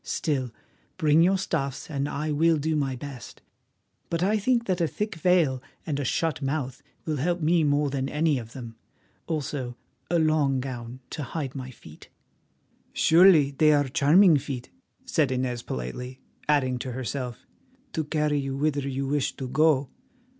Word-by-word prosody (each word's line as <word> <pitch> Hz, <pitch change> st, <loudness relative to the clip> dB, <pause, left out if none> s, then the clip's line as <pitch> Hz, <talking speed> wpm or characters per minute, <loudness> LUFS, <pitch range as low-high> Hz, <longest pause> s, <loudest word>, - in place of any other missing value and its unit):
Still, 135 Hz, -6 st, -1 dB, 0.5 s
bring 155 Hz, +1 st, +4 dB
your 190 Hz, +3 st, +4 dB
stuffs 140 Hz, -7 st, -3 dB
and 140 Hz, -2 st, -2 dB
I 150 Hz, +2 st, -2 dB
will 160 Hz, +2 st, +3 dB
do 155 Hz, +2 st, -1 dB
my 135 Hz, -3 st, 0 dB
best; 135 Hz, -1 st, -9 dB, 0.7 s
but 170 Hz, +1 st, -1 dB
I 210 Hz, +3 st, +2 dB
think 235 Hz, +2 st, +1 dB
that 185 Hz, -3 st, 0 dB
a 165 Hz, -, +3 dB
thick 210 Hz, -, -3 dB
veil 165 Hz, -6 st, +2 dB, 0.2 s
and 145 Hz, -3 st, -2 dB
a -, -, -1 dB
shut 155 Hz, +3 st, -1 dB
mouth 135 Hz, -2 st, -3 dB, 0.2 s
will 155 Hz, -2 st, -1 dB
help 175 Hz, +6 st, 0 dB
me 165 Hz, +1 st, +3 dB
more 145 Hz, -1 st, +2 dB
than 135 Hz, -1 st, -2 dB
any 150 Hz, -2 st, +1 dB
of 115 Hz, 0 st, -10 dB
them, 115 Hz, -3 st, -9 dB, 0.5 s
also 140 Hz, -6 st, -3 dB, 0.3 s
a 175 Hz, -, +2 dB
long 155 Hz, -4 st, +2 dB
gown 125 Hz, -1 st, -6 dB
to -, -, -4 dB
hide 140 Hz, 0 st, -4 dB
my 130 Hz, -2 st, -6 dB
feet." 80 Hz, -10 st, -14 dB, 0.8 s
"Surely 165 Hz, -4 st, +6 dB
they 150 Hz, +2 st, +4 dB
are 145 Hz, -1 st, +2 dB
charming 155 Hz, +6 st, +5 dB
feet," 130 Hz, -2 st, -6 dB, 0.3 s
said 155 Hz, -, +1 dB
Inez 125 Hz, -2 st, -1 dB
politely, 125 Hz, -, -6 dB, 0.3 s
adding 130 Hz, -4 st, +2 dB
to 125 Hz, 0 st, -5 dB
herself, 125 Hz, -1 st, -5 dB, 0.5 s
"to 160 Hz, -, -1 dB
carry 150 Hz, -1 st, 0 dB
you 135 Hz, -1 st, -3 dB
whither 145 Hz, -1 st, 0 dB
you 135 Hz, +1 st, -2 dB
wish 145 Hz, 0 st, -1 dB
to 130 Hz, -, -5 dB
go." 145 Hz, 0 st, +2 dB
145 Hz, 165 wpm, -26 LUFS, 130-160 Hz, 0.8 s, Surely